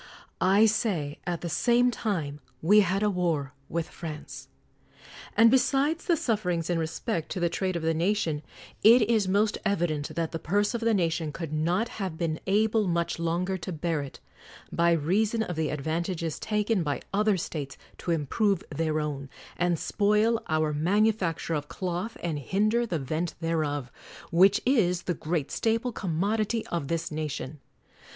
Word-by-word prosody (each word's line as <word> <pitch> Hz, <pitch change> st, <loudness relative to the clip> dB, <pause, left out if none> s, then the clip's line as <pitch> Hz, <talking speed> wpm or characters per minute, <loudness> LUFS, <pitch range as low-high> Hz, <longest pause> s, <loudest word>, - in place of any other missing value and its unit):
I 220 Hz, -, +7 dB
say, 185 Hz, -10 st, 0 dB
at 175 Hz, -1 st, -2 dB
the 175 Hz, -, -3 dB
same 245 Hz, +7 st, +3 dB
time 165 Hz, -12 st, -2 dB, 0.2 s
we 205 Hz, +6 st, +5 dB
had 195 Hz, +1 st, +2 dB
a 210 Hz, -, +3 dB
war 165 Hz, -7 st, -1 dB, 0.2 s
with 165 Hz, 0 st, -2 dB
France. 150 Hz, -, -8 dB, 0.9 s
And 225 Hz, +1 st, +7 dB
besides 275 Hz, +5 st, +2 dB
the 340 Hz, -3 st, +3 dB
sufferings 180 Hz, -, -1 dB
in 170 Hz, -, +1 dB
respect 160 Hz, +2 st, -3 dB
to -, -, -3 dB
the 175 Hz, -1 st, +2 dB
trade 185 Hz, +1 st, -2 dB
of 170 Hz, -, -2 dB
the 165 Hz, 0 st, +2 dB
nation, 165 Hz, -3 st, 0 dB, 0.4 s
it 230 Hz, +2 st, +8 dB
is 215 Hz, -3 st, +2 dB
most 205 Hz, +3 st, +2 dB
evident 160 Hz, -7 st, -1 dB
that 165 Hz, -1 st, -1 dB
the 165 Hz, -, -4 dB
purse 205 Hz, +8 st, +1 dB
of 235 Hz, -, -2 dB
the 230 Hz, -1 st, +2 dB
nation 165 Hz, -4 st, 0 dB
could 160 Hz, 0 st, -6 dB
not 175 Hz, +8 st, +1 dB
have 185 Hz, -5 st, -3 dB
been 160 Hz, -2 st, -1 dB
able 215 Hz, +1 st, +2 dB
much 170 Hz, -1 st, -1 dB
longer 175 Hz, +3 st, -1 dB
to 175 Hz, +2 st, -5 dB
bear 165 Hz, -1 st, -1 dB
it, 140 Hz, -, -8 dB, 0.5 s
by 170 Hz, 0 st, +3 dB
reason 205 Hz, +8 st, +1 dB
of 180 Hz, -, -4 dB
the 155 Hz, -1 st, 0 dB
advantages 160 Hz, +3 st, -2 dB
taken 210 Hz, -1 st, 0 dB
by 145 Hz, -3 st, -2 dB
other 210 Hz, 0 st, +3 dB
states 145 Hz, -5 st, -5 dB, 0.2 s
to 175 Hz, -, -2 dB
im 160 Hz, -3 st, 0 dB
prove 200 Hz, -, +1 dB
their 155 Hz, -1 st, 0 dB
own, 140 Hz, -3 st, -4 dB, 0.3 s
and 175 Hz, -1 st, +1 dB
spoil 210 Hz, +5 st, +2 dB
our 155 Hz, -1 st, +1 dB
manufacture 185 Hz, +1 st, +1 dB
of 150 Hz, -1 st, -2 dB
cloth, 185 Hz, +6 st, -4 dB
and 160 Hz, -4 st, -1 dB
hinder 215 Hz, -, +1 dB
the 175 Hz, -, -1 dB
vent 155 Hz, +5 st, -3 dB
thereof; 150 Hz, -6 st, -1 dB, 0.4 s
which 190 Hz, +5 st, +5 dB
is 185 Hz, -9 st, +2 dB
the 180 Hz, -, -1 dB
great 160 Hz, -3 st, -2 dB
staple 230 Hz, +2 st, 0 dB
commodity 210 Hz, +4 st, -1 dB
of 170 Hz, -5 st, -2 dB
this 165 Hz, +1 st, -2 dB
nation. 150 Hz, -2 st, -4 dB
175 Hz, 165 wpm, -27 LUFS, 160-210 Hz, 0.9 s, it